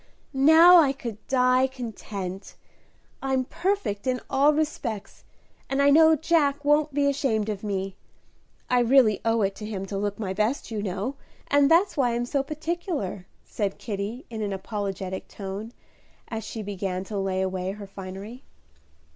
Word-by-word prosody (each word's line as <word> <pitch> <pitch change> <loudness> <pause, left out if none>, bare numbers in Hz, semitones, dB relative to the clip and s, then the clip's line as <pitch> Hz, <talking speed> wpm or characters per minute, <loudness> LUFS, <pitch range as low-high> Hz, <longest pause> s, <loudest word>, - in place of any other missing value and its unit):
"Now 320 +6 +8
I 290 -5 +5
could 235 -6 -7
die 255 0 +3
content; 210 -7 -7 0.7
I'm 265 -1 0
perfect 345 - -2
in 250 -1 +1
all 280 +2 +5
respects, 290 -9 -3 0.5
and 270 - 0
I 280 0 +5
know 320 +2 +7
Jack 295 -2 +1
won't 295 +1 +3
be 280 0 +1
ashamed 245 -7 0
of 205 -1 -4
me. 195 -2 -3 0.7
I 250 - +3
really 240 -4 +4
owe 225 -1 +2
it 195 0 0
to 210 - -7
him 195 -3 -4
to 195 0 -4
look 205 0 -2
my 195 -4 -3
best, 220 +6 -1
you 215 -2 -2
know, 205 +7 -3 0.3
and 285 0 +5
that's 360 +4 +4
why 245 -4 +1
I'm 240 0 -1
so 275 +3 0
particular," 305 - -4 0.2
said 200 -3 -3
Kitty, 210 +3 -5
in 220 -1 -4
an 205 -2 -2
apologetic 195 -1 -4
tone, 200 +3 -6 0.6
as 225 -1 -4
she 220 - -6
began 190 -2 -3
to 200 +1 -4
lay 190 -1 0
away 185 0 -2
her 205 0 -8
finery. 195 +5 -8
225 Hz, 160 wpm, -26 LUFS, 200-280 Hz, 0.7 s, Now